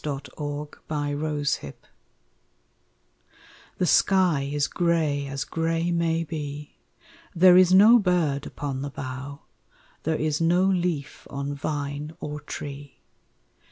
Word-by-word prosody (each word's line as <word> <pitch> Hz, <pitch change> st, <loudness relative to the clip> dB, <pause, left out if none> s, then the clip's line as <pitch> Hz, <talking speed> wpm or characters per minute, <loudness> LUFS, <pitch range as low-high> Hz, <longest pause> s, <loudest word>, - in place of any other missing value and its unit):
NO 145 Hz, -3 st, -2 dB, 0.2 s
SONGS 145 Hz, 0 st, -5 dB
IN 145 Hz, -2 st, -2 dB
WINTER 145 Hz, -, -2 dB, 2.0 s
The 180 Hz, -, +1 dB
sky 175 Hz, -7 st, +3 dB
is 145 Hz, -1 st, +1 dB
gray 160 Hz, -5 st, 0 dB
as 135 Hz, 0 st, -3 dB
gray 165 Hz, +1 st, -1 dB
may 165 Hz, -1 st, +1 dB
be, 150 Hz, -2 st, -6 dB, 0.6 s
There 180 Hz, +1 st, +7 dB
is 185 Hz, -1 st, +6 dB
no 215 Hz, +6 st, +8 dB
bird 170 Hz, -8 st, 0 dB
upon 135 Hz, -2 st, -5 dB
the 140 Hz, -, -4 dB
bough, 135 Hz, +2 st, -7 dB, 0.6 s
There 160 Hz, 0 st, 0 dB
is 155 Hz, 0 st, -1 dB
no 175 Hz, +3 st, +3 dB
leaf 175 Hz, -7 st, -1 dB
on 140 Hz, 0 st, -4 dB
vine 145 Hz, +1 st, -4 dB
or 150 Hz, 0 st, -5 dB
tree. 140 Hz, -2 st, -8 dB
150 Hz, 120 wpm, -25 LUFS, 145-170 Hz, 2.0 s, no